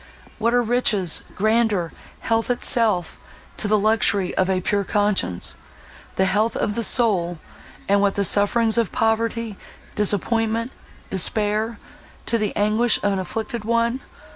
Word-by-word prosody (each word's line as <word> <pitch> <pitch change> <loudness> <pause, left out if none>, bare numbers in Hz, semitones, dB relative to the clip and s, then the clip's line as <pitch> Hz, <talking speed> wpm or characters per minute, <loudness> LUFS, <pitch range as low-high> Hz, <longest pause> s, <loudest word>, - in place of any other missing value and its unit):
What 230 +2 +1
are 245 - +3
riches—grandeur—health 220 -1 -1
itself, 220 -7 +1 0.4
to - - -1
the 215 +1 +3
luxury 205 -3 +2
of 185 0 0
a 185 -1 +1
pure 200 +2 -1
conscience, 200 - 0 0.6
the 190 - +2
health 210 +4 0
of 210 - -1
the 235 - -2
soul;—and 200 -2 0
what 200 -1 +1
the 200 - 0
sufferings 220 +4 +3
of 230 - -1
poverty, 225 -2 -1 0.4
disappointment, 225 +3 0 0.4
despair—to 215 +4 -1
the 210 -1 -2
anguish 215 +3 +2
of 205 - +1
an 195 - -2
afflicted 225 +5 -5
one! 235 +2 0
215 Hz, 120 wpm, -21 LUFS, 200-230 Hz, 0.6 s, are